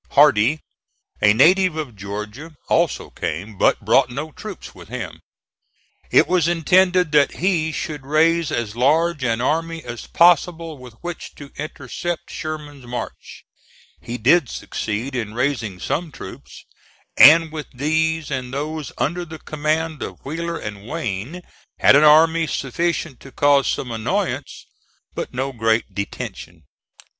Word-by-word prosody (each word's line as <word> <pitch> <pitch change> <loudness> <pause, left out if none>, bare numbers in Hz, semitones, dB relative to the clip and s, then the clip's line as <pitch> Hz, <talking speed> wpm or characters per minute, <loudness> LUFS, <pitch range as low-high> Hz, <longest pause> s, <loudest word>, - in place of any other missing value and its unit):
Hardee, 145 0 +5 0.6
a 105 - +6
native 180 - +4
of 150 -8 -5
Georgia, 105 +10 -7
also - - +1
came, 100 +7 -5
but - - +2
brought 130 -2 +4
no 150 +5 -5
troops 210 +5 -9
with - - -13
him. - - -6 0.9
It - - +5
was 175 -3 +2
intended 180 0 +3
that 145 -2 +4
he 170 -3 0
should 150 -1 -4
raise 160 +3 +2
as 110 -2 -2
large 150 +4 +2
an 115 -2 0
army 165 +4 -1
as 120 -1 -8
possible 170 -3 +3
with 125 -3 -12
which 175 -1 -7
to 145 -1 -11
intercept 155 +3 -5
Sherman's 150 -4 -7
march. 120 0 -7 0.6
He 120 - -5
did 135 +4 +3
succeed 115 +5 -4
in 110 -3 -4
raising 120 -7 -1
some 165 - -2
troops, - - -11 0.5
and 160 +2 +8
with 155 -1 -6
these 160 +3 0
and 130 -2 -3
those 150 +2 -4
under 175 +4 -1
the 160 -2 -9
command 155 0 -2
of - - -7
Wheeler 170 +4 -3
and 105 0 -8
Wayne, 120 - -4 0.3
had - - +6
an 145 - +6
army 160 +2 +5
sufficient 155 +1 -2
to 135 - -13
cause 140 -1 +3
some 125 - -2
annoyance 110 -1 -3 0.5
but - - -5
no 130 +2 -2
great 115 -1 0
detention. 100 0 -6
150 Hz, 140 wpm, -21 LUFS, 125-165 Hz, 0.9 s, and